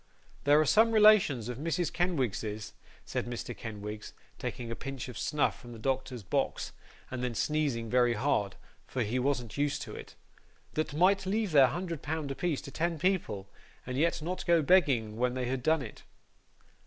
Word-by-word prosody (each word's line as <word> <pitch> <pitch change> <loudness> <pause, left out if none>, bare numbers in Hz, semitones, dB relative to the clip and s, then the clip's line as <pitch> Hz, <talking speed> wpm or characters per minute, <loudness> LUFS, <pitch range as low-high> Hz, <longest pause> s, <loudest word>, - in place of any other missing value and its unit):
'There 145 +1 +6
are 155 - +4
some 225 +9 +5
relations 210 - +6
of 125 0 -5
Mrs. 165 +2 -1
Kenwigs's,' 110 - -1 0.3
said - - -3
Mr. 120 -1 -5
Kenwigs, 105 -1 -7 0.3
taking 120 -1 -4
a - - -2
pinch 135 0 -6
of 125 - -8
snuff 150 +7 0
from 120 -2 -11
the - - -9
doctor's 130 -1 -2
box, - - -1 0.4
and 130 -1 -3
then 125 -2 -2
sneezing 145 -7 0
very 120 0 +3
hard, 105 -5 0 0.3
for 125 - -1
he 115 +4 -1
wasn't 125 -5 -1
used 145 0 0
to - - -8
it, - - -10 0.6
'that 155 -1 -2
might 190 +3 +3
leave 210 0 0
their 140 -3 +7
hundred 170 +2 -4
pound 155 -2 -3
apiece 155 +1 -1
to 140 - -9
ten 170 +2 -1
people, 155 - 0 0.4
and 125 - -4
yet 165 +2 +1
not 180 +3 -3
go 170 -2 +4
begging 135 - +3
when 125 +1 +1
they 130 -1 -1
had 130 +1 -2
done 160 +1 +2
it. - - -10
135 Hz, 180 wpm, -30 LUFS, 120-165 Hz, 0.6 s, their